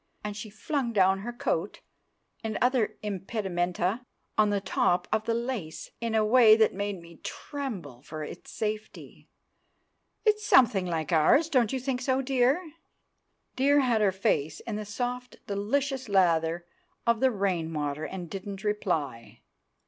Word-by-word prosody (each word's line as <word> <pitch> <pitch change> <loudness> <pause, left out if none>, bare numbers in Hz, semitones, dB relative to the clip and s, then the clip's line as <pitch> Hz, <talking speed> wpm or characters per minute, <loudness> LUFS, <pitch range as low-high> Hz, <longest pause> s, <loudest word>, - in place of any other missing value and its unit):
And 210 -1 -4
she 215 +1 -7
flung 235 +4 -2
down 190 -1 +4
her 230 +5 -5
coat 240 - -2 0.6
and 220 -1 -2
other 250 -3 +1
impedimenta 190 0 -2 0.3
on 215 -1 +4
the 205 -1 +1
top 180 -2 +1
of 215 0 +1
the 230 0 +1
lace 235 -10 -4
in 230 -1 -1
a 215 -1 +3
way 220 -1 +7
that 220 -1 +3
made 200 -1 -3
me 170 -1 -14
tremble 200 - -6
for 155 +2 -7
its - - -9
safety. 215 -1 -5 1.0
"It's 425 0 +3
something 210 - +5
like 160 -2 -2
ours—don't 245 - +4
you 265 - -1
think 255 0 -2
so, 260 +1 +1
dear?" 270 +6 +1 0.8
Dear 285 +2 +4
had 240 -4 +2
her 200 -2 +4
face 160 -5 0
in 225 - -5
the 215 0 -4
soft 245 +4 -4
delicious 260 +5 -1
lather 170 -3 +2 0.4
of 235 -1 +3
the 265 - +4
rainwater, 165 - -1
and 180 +1 -5
didn't 195 +2 -7
reply. 145 - -2
210 Hz, 145 wpm, -28 LUFS, 180-245 Hz, 1.0 s, way